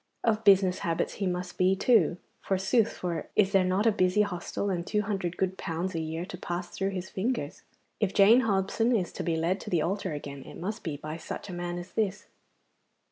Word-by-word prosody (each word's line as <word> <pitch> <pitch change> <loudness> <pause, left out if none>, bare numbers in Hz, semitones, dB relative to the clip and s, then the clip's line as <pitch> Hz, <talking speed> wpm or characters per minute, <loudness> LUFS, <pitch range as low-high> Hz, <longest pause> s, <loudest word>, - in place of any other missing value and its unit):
Of 220 -1 +1
business 190 -3 +5
habits 165 -1 -1
he 195 - +1
must 180 0 -4
be, 185 +1 +4
too, 225 -4 +3 0.2
forsooth, 195 +4 +2
for 170 -4 -4
is 195 -2 +4
there 195 -2 +4
not 185 +4 +1
a 225 - +6
busy 190 0 +3
hostel 200 +1 -3
and 175 -2 -1
two 210 -1 +1
hundred 195 -4 -2
good 190 0 -1
pounds 170 +3 -3
a 165 - -2
year 160 +2 -3
to 180 -2 -8
pass 175 0 -4
through 195 - -2
his 190 -1 -5
fingers? 195 - -2 0.4
If 205 -3 +1
Jane 210 +5 +7
Hobson 225 +2 +1
is 185 -5 -1
to - - -5
be 165 - 0
led 170 +4 0
to - - -7
the 170 -4 +2
altar 195 0 -2
again 140 -1 -6
it - - -11
must 210 +6 -4
be 155 -5 -4
by 155 +2 -6
such 170 - -7
a - - -5
man 175 0 -3
as 175 +1 -8
this. 210 -2 -1
185 Hz, 215 wpm, -28 LUFS, 175-200 Hz, 0.4 s, Jane